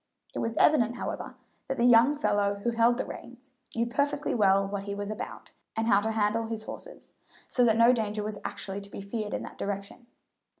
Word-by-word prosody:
It - - -3
was 230 0 -2
evident, 240 -6 +4
however, - - -5 0.3
that 270 - -2
the 235 - +3
young 245 +4 +6
fellow 205 -8 +1
who 235 - +1
held 235 +1 +3
the - - -2
reins 255 +2 -11 0.2
knew 230 0 +1
perfectly 285 +4 0
well 195 -3 +4
what 200 0 -4
he 200 0 -4
was 205 +1 -4
about, 220 +4 -7 0.2
and 225 - 0
how 205 -3 +4
to 220 - -1
handle 220 +1 +1
his 225 -1 -4
horses, - - -10 0.3
so 250 - +2
that 225 -1 +4
no 230 +2 +7
danger 215 -3 -1
was 210 -1 -4
actually 195 +1 -4
to 200 - -8
be 200 - -7
feared 210 +1 -4
in - - -4
that - - -10
direction. 200 +4 -5
225 Hz, 210 wpm, -28 LUFS, 205-240 Hz, 0.3 s, no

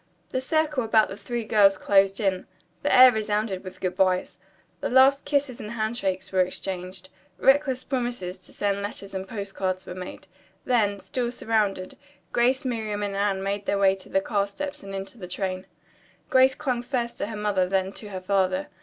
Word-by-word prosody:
The 255 - -2
circle 300 -1 +1
about 220 -1 +3
the 195 - -6
three 230 +3 -4
girls 200 -3 +5
closed 195 0 +3
in. 190 -3 0 0.3
The - - 0
air 255 0 +9
resounded 210 -3 -1
with 185 -1 -9
good 180 -1 -2
byes. 185 -1 +1 0.4
The - - -2
last 265 +2 +5
kisses 285 -4 0
and 210 +1 -6
handshakes 215 -5 -2
were 190 -1 +3
exchanged. 185 0 -4 0.3
Reckless 270 0 +3
promises 240 -9 -3
to - - -14
send 200 -1 -1
letters 200 -1 -6
and 190 0 -4
postcards 195 -2 -3
were - - -7
made. 185 +1 -8 0.4
Then, 210 -5 +2
still 240 +3 -3
surrounded, 210 -6 -1 0.3
Grace, 255 +3 +2
Miriam 215 -4 -2
and 200 -1 -3
Anne 195 -1 0
made 200 0 -3
their 200 - +1
way 195 -1 +4
to 190 - -14
the 195 - +2
car 200 -1 0
steps 290 +8 -6
and 195 -3 -7
into 195 +4 -7
the 180 - -7
train. 185 +1 -3 0.6
Grace 260 0 +5
clung 255 -5 -1
first 240 -1 -3
to - - -1
her 220 -1 -6
mother 200 -3 +1
then 190 0 0
to 210 - -8
her 190 -2 -6
father. 190 0 0
205 Hz, 185 wpm, -25 LUFS, 190-240 Hz, 0.6 s, air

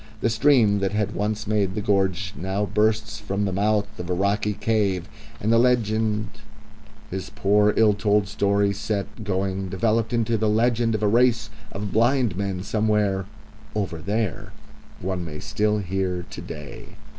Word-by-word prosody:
The 115 - +2
stream 110 -4 +4
that 100 0 -1
had 105 0 -1
once 105 +1 -2
made 100 -3 0
the - - -1
gorge 100 -1 0
now 95 +4 -2
bursts 110 +2 0
from 100 -1 -2
the 95 - -1
mouth 105 +2 +2
of 90 0 -5
a 90 - +1
rocky 100 +3 +1
cave, 100 -4 0 0.3
and 110 +2 +1
the 115 - +5
legend 110 -3 +1 0.8
his 95 0 -4
poor, 105 +1 +3
ill 110 -2 +5
told 100 0 +1
story 100 0 +1
set 105 +2 -4
going 95 -1 -2
developed 110 +4 0
into 115 -2 +1
the 110 0 +2
legend 115 +1 +2
of 110 - -3
a - - +4
race 115 0 +3 0.2
of 100 0 -4
blind 120 -2 +2
men 95 -2 -3
somewhere 105 -2 +1 0.5
"over 95 -6 -2
there" 105 +3 -2 0.5
one 95 -1 -2
may 75 -2 -6
still 105 +2 0
hear 95 -2 -2
to - - -7
day. 75 -2 -9
105 Hz, 160 wpm, -24 LUFS, 95-110 Hz, 0.8 s, the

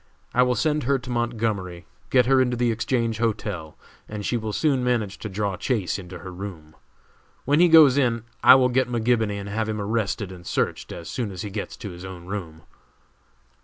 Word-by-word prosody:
I 125 - +4
will 125 0 +3
send 150 +1 +1
her 140 +1 +3
to 125 0 -8
Montgomery, 110 -7 -2 0.2
get 125 -2 +4
her 135 +1 +4
into 125 -1 0
the 120 -1 +2
Exchange 115 -1 -1
Hotel, 105 -8 -2 0.3
and 105 -1 -5
she - - 0
will 110 -2 -2
soon 135 +1 +1
manage 115 -6 -1
to 105 - -5
draw 100 -1 -2
Chase 100 -2 -1
into 90 -1 -9
her 90 +2 -9
room. 90 -5 -8 0.7
When 145 +3 +3
he 175 - +7
goes 150 -4 +7
in 120 -4 +1 0.2
I - - +10
will 130 -1 +4
get 125 0 +1
McGibony 115 -3 +1
and 100 - -7
have 110 +2 -2
him 105 -1 -2
arrested 105 -1 -2
and 90 -1 -11
searched - - -2
as 85 - -8
soon 120 -5 -3
as 95 0 -6
he 105 - -6
gets 100 0 -5
to 100 - -7
his 90 +1 -10
own 95 -2 -9
room." 90 -5 -6
110 Hz, 200 wpm, -24 LUFS, 95-125 Hz, 0.7 s, I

